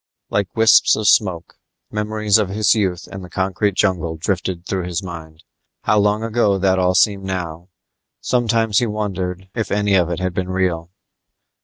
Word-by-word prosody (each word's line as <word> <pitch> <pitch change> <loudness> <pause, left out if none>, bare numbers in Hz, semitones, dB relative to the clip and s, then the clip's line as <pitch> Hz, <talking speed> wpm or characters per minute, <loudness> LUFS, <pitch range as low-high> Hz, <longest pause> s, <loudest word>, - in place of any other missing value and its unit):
Like 100 -3 -1
wisps 115 0 +5
of 110 -1 -2
smoke, 90 -5 +1 0.3
memories 105 0 +1
of 105 -3 0
his 105 +2 +2
youth 95 -6 -1
in 95 - -7
the 90 - -10
concrete 95 +2 -1
jungle 85 -5 0
drifted 90 0 -3
through 95 -2 -2
his 90 +2 -3
mind. 80 -3 -9 0.4
How 105 - +3
long 105 +2 +1
ago 110 -3 +1
that 95 0 +2
all 90 0 +2
seemed 100 0 +3
now. 90 -2 -5 0.5
Sometimes 115 -4 +1
he 120 - 0
wondered 95 -3 -4
if 110 -2 -3
any 105 0 +1
of 90 -3 +3
it 85 - -2
had 95 -1 -2
been 90 +1 -3
real. 90 -3 -1
95 Hz, 170 wpm, -19 LUFS, 90-105 Hz, 0.5 s, wisps